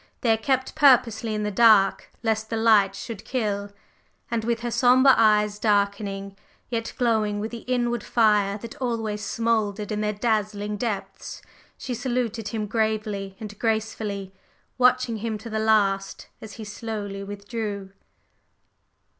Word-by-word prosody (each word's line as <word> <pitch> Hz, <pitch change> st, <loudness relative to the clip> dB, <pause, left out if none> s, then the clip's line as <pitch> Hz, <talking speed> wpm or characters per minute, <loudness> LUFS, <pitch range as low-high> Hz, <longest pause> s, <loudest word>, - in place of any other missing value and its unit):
They 235 Hz, -, +3 dB
are -, -, +1 dB
kept 260 Hz, +3 st, -1 dB
purposely 245 Hz, -7 st, +4 dB
in 210 Hz, -, -2 dB
the 210 Hz, -, -1 dB
dark 205 Hz, -2 st, +4 dB
lest 220 Hz, -1 st, 0 dB
the 225 Hz, -, -2 dB
light 210 Hz, -3 st, +4 dB
should 225 Hz, 0 st, -7 dB
kill!" 205 Hz, -5 st, -2 dB, 0.6 s
And 230 Hz, -1 st, -1 dB
with 235 Hz, 0 st, -1 dB
her 240 Hz, 0 st, -3 dB
sombre 255 Hz, +3 st, +5 dB
eyes 210 Hz, -1 st, +3 dB
darkening, 200 Hz, -2 st, 0 dB, 0.4 s
yet 230 Hz, -1 st, -2 dB
glowing 220 Hz, -4 st, +1 dB
with 220 Hz, +2 st, -4 dB
the 235 Hz, -, -6 dB
inward 240 Hz, -2 st, 0 dB
fire 210 Hz, -3 st, +2 dB
that 230 Hz, +5 st, -9 dB
always 225 Hz, -4 st, -2 dB
smouldered 220 Hz, -2 st, -1 dB
in 210 Hz, 0 st, -1 dB
their 210 Hz, 0 st, 0 dB
dazzling 210 Hz, -1 st, -1 dB
depths, 200 Hz, -4 st, -5 dB, 0.3 s
she 255 Hz, -, -5 dB
saluted 240 Hz, -3 st, -2 dB
him 215 Hz, 0 st, -3 dB
gravely 215 Hz, -3 st, -2 dB
and 210 Hz, -2 st, -8 dB
gracefully, 220 Hz, -3 st, -2 dB, 0.5 s
watching 250 Hz, -2 st, +3 dB
him 220 Hz, 0 st, -3 dB
to 220 Hz, +2 st, -9 dB
the 220 Hz, -, -1 dB
last 200 Hz, -3 st, +1 dB
as 220 Hz, -2 st, -9 dB
he 220 Hz, -, -8 dB
slowly 205 Hz, -2 st, -5 dB
withdrew. 205 Hz, -1 st, -5 dB
220 Hz, 145 wpm, -24 LUFS, 205-230 Hz, 0.6 s, sombre